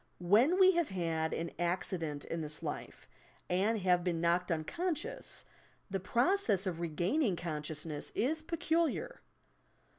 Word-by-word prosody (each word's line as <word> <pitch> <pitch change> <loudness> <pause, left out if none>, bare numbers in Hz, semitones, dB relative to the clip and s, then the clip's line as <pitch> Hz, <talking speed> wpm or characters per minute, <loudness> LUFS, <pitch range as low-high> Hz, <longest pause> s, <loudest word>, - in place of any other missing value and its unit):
When 225 - +4
we 375 0 +8
have 340 -4 +1
had 165 -3 -1
an 170 - -3
accident 170 -4 -1
in 165 - -3
this 155 0 -4
life, - - -6 0.4
and 200 +5 +2
have 180 -1 +3
been 170 -2 0
knocked 175 +2 +1
unconscious, 305 - -3 0.5
the 195 - 0
process 235 - +2
of 175 -3 -2
regaining 175 - +1
consciousness 155 -2 -4
is 310 +8 +1
peculiar. 335 +7 -1
180 Hz, 125 wpm, -33 LUFS, -, 0.5 s, we